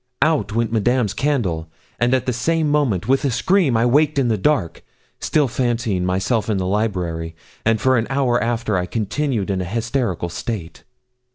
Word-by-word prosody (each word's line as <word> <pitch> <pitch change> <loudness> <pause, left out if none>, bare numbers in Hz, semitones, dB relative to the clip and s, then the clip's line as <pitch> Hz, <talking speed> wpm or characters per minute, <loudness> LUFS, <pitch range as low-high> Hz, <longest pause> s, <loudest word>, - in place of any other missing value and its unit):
Out 155 -6 +1
went 115 -1 0
Madame's 115 -1 +1
candle, 95 - -1 0.3
and 120 +2 +3
at 130 - -1
the 125 - 0
same 160 +6 0
moment, 135 -11 +1
with 135 +2 +2
a 140 - +2
scream, 140 - +2
I 115 - +2
waked 145 +4 +3
in 130 -3 +2
the 110 - +2
dark 135 - 0 0.4
still 150 -3 +1
fancying 120 -6 -1
myself 95 +5 0
in 105 - +1
the 95 - -1
library; 90 -5 -2 0.3
and 115 -1 +3
for 130 +2 +3
an 115 - -2
hour 130 -5 +1
after 115 -4 0
I 90 - -3
continued 110 0 -1
in 95 -1 -1
a - - -3
hysterical 115 -3 -2
state. 90 -1 -6
115 Hz, 180 wpm, -20 LUFS, 100-135 Hz, 0.4 s, and